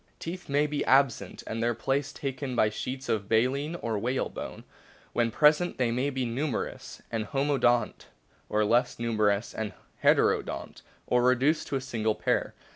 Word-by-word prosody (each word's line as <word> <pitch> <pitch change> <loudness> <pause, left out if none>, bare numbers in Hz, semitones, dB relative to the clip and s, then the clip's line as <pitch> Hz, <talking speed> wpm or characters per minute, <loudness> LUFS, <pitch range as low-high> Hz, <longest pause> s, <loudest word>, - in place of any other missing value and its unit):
Teeth 175 0 -7
may 145 +2 +3
be 150 -1 -1
absent 135 -2 +2
and 115 +1 -4
their 120 0 +1
place 135 +4 -1
taken 135 -2 -4
by 110 -2 +3
sheets 130 +5 -5
of 100 -3 -1
baleen 135 +8 +1
or 110 -3 -1
whalebone; 125 +5 -3 0.5
when 120 -1 +2
present 150 +8 +3
they 125 -3 +1
may 125 +4 0
be 130 -2 -2
very 115 - -3
numerous 140 -1 -4
and 110 -2 -1
homo 140 +4 0
dont, 120 -3 +1 0.4
or 105 0 +2
less 120 +4 +2
numerous 110 -2 +1
and 110 -3 -4 0.3
heterodont, - - +2 0.2
or 125 - +2
reduced 130 +5 +2
to - - -2
a 135 - -1
single 110 -4 -1
pair. - - 0
125 Hz, 165 wpm, -28 LUFS, 115-140 Hz, 0.5 s, may